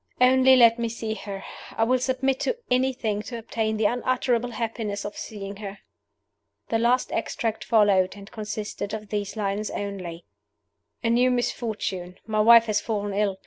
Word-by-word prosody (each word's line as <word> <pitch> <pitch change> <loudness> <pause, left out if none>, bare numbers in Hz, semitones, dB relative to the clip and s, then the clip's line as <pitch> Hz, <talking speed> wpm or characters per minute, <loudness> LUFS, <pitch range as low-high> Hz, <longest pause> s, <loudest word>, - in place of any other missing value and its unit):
"Only 260 +1 +6
let 235 -2 +6
me 230 -1 -1
see 225 -1 -4
her! 200 -3 -7 0.3
I 225 - +3
will 255 +3 +2
submit 260 +1 0
to 480 - -1
anything 250 -5 +1
to 235 +2 -6
obtain 220 -1 -2
the 215 - +1
unutterable 245 +1 +1
happiness 220 -3 -3
of 205 - -5
seeing 200 -2 -7
her!" 200 -1 -7 0.9
The 225 - +1
last 240 +2 +2
extract 225 -5 -2
followed, 205 -5 +3
and 200 0 -12
consisted 210 -1 -4
of 215 -1 -8
these 205 -1 -3
lines 205 0 -1
only: 185 -4 -5 0.8
"A 230 - +2
new 245 +2 +4
misfortune! 215 -7 -2
My 215 -1 -1
wife 230 +1 +8
has 215 -2 +1
fallen 205 -2 -2
ill. 200 -1 0
220 Hz, 160 wpm, -25 LUFS, 205-240 Hz, 0.9 s, wife